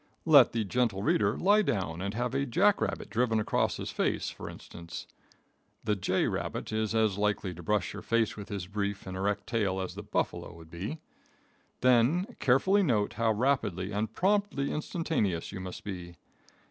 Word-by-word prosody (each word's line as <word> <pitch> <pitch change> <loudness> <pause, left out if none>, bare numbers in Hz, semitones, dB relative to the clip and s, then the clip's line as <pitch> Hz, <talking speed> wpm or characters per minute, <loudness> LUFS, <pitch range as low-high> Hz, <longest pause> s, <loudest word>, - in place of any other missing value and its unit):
Let 145 -7 +7
the 115 -1 0
gentle 105 -2 0
reader 105 -1 +2
lie 205 +3 +4
down 90 - -1
and 100 +2 -3
have 120 +1 -1
a 140 +1 0
Jackrabbit 200 - +2
driven 115 -1 +2
across 105 - 0
his - - -5
face, - - -1
for - - -8
instance. 85 0 -9 0.8
The 105 -1 +1
J. 95 -1 +1
Rabbit - - -3
is 110 0 0
as 110 -3 +2
likely 105 -2 0
to 85 - -10
brush 100 +2 0
your 100 - -7
face 115 -2 +1
with 105 0 -8
his 100 -4 -4
brief 100 +1 -3
and 95 - -6
erect 100 +2 -1
tail 100 -5 0
as 95 -1 -4
the - - -7
buffalo - - -2
would 80 -1 -14
be. 100 - -5 0.8
Then 130 - +3
carefully 190 +11 +4
note 110 - +1
how 115 -1 +1
rapidly 105 -6 0
and 105 +2 -1
promptly 195 - +1
instantaneous 150 - -1
you 100 - -6
must 95 -1 -7
be. 90 -3 -6
105 Hz, 170 wpm, -30 LUFS, 95-125 Hz, 0.8 s, Let